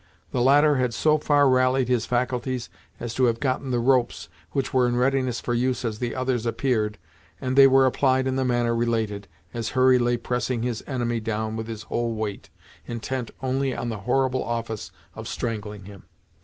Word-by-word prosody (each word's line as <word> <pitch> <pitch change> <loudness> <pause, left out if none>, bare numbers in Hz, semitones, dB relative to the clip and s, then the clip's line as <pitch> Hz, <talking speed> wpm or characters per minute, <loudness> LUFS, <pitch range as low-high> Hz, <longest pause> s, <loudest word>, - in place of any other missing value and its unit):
The 125 - 0
latter 145 +3 +5
had 125 -2 0
so 155 0 +3
far 145 -1 +3
rallied 130 0 +3
his 125 -3 0
faculties 125 0 -1 0.3
as 120 -1 -5
to 130 - +2
have 115 -1 +1
gotten 130 -1 -1
the 125 - +1
ropes, 125 0 +1 0.2
which 135 -2 -2
were 125 -1 +4
in 120 - 0
readiness 130 -1 +1
for 120 - -3
use 125 +1 0
as 110 -2 -3
the 120 -2 -3
others 130 -2 -1
appeared, 115 -3 0 0.4
and 130 +3 -2
they 135 0 +9
were 135 0 +5
applied 130 0 +2
in 130 0 0
the 135 - +1
manner 120 -2 +1
related, 110 -4 -1 0.3
as 115 -2 -3
Hurry 130 0 +5
lay 120 0 +1
pressing 120 0 -2
his 120 -2 -3
enemy 120 -4 -1
down 110 0 -3
with 110 0 -4
his 110 -2 -6
whole 120 -1 -2
weight, 110 -2 -5 0.4
intent 120 +1 -4
only 130 0 0
on 120 - -3
the 110 -3 -4
horrible 130 0 +1
office 115 -2 -4 0.2
of - - -8
strangling 105 -4 -4
him. 100 -1 -11
125 Hz, 190 wpm, -24 LUFS, 115-130 Hz, 0.4 s, they